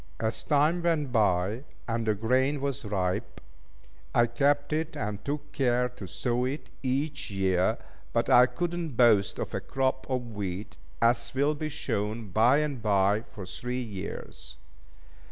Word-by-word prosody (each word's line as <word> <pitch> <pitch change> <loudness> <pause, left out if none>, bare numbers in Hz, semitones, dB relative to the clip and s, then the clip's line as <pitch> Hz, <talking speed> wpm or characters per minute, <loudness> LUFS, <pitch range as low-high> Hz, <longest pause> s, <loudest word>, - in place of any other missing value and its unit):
As 110 0 -1
time 150 +8 +2
went 160 -6 +1
by, 105 +1 +2 0.2
and 115 -1 -1
the 110 - +3
grain 130 +7 +1
was 140 -2 -2
ripe, 95 -3 -2 0.8
I 120 - +6
kept 145 +5 +1
it, 160 +1 -2
and 105 -1 -3
took 145 0 -4
care 125 -3 +1
to 120 -6 -9
sow 120 +7 -1
it 135 0 -4
each 140 +3 -1
year; 95 -2 +1 0.3
but - - +1
I 125 +1 +7
could 175 +5 -2
not 165 -8 -4
boast 110 -5 +4
of - - -4
a - - 0
crop 130 0 -1
of 125 -3 -2
wheat, 100 -1 -4 0.3
as 115 0 +3
will 140 +3 +3
be 155 +1 -4
shown 110 -7 -3
bye 120 +9 +4
and 140 -5 -5
bye, 100 0 +3
for 105 -4 -10
three 125 +8 -4
years. 100 -5 -7
120 Hz, 155 wpm, -28 LUFS, 105-140 Hz, 0.8 s, I